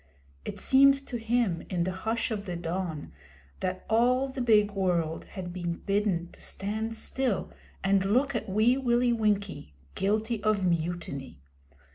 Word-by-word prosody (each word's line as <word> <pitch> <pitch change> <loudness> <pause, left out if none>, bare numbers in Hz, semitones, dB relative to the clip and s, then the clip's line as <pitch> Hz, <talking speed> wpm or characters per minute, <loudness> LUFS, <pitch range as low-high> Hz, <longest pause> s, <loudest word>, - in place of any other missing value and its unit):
It - - -5
seemed 275 +1 +6
to 245 - -4
him 225 -6 +1
in 175 -2 0
the 185 - -1
hush 225 +6 -2
of 205 -2 -3
the 180 - -3
dawn 170 -2 -4 0.5
that 185 0 -3
all 250 +4 +3
the 265 0 -4
big 210 -3 +4
world 175 -5 0
had 180 -2 -7
been 175 -2 -3
bidden 195 -3 -1
to - - -17
stand 220 +3 -3
still 255 -1 -2 0.3
and 195 0 +3
look 255 +8 +2
at 235 -4 -3
Wee 220 +6 +3
Willie 245 -2 +2
Winkie 200 - -1 0.2
guilty 215 +3 0
of 215 -3 +1
mutiny. 170 - -2
205 Hz, 150 wpm, -28 LUFS, 180-230 Hz, 0.5 s, seemed